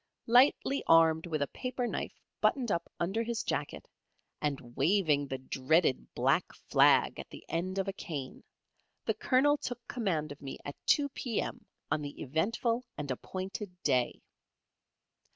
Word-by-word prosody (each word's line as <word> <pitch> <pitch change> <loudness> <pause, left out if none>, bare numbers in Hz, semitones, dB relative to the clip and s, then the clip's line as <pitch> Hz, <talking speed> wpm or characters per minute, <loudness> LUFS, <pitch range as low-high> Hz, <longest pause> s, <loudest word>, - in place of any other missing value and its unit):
Lightly 260 +3 +4
armed 165 0 +5
with 155 -3 0
a - - -2
paper 255 -1 -3
knife - - -4 0.2
buttoned 245 -6 +2
up 170 - -2
under 195 +6 0
his 230 0 -2
jacket, - - -3 0.5
and 135 -5 -3
waving 150 -2 +2
the 135 - -3
dreaded 130 +3 +1
black - - +1 0.2
flag - - +5
at - - -7
the - - -11
end 185 +3 -2
of 195 0 0
a 195 - -2
cane, 145 -9 -6 0.6
the - - +2
Colonel 290 +3 +3
took 245 -3 -6
command 165 - -1
of 145 - -10
me 135 -1 -6
at 145 - -5
2 285 -1 +4
P.M. 245 -4 -3 0.2
on 150 - +1
the 145 -1 -7
eventful 225 - 0
and 145 -2 -3
appointed 185 - -5
day. 125 -1 +1
175 Hz, 150 wpm, -31 LUFS, 145-230 Hz, 0.6 s, armed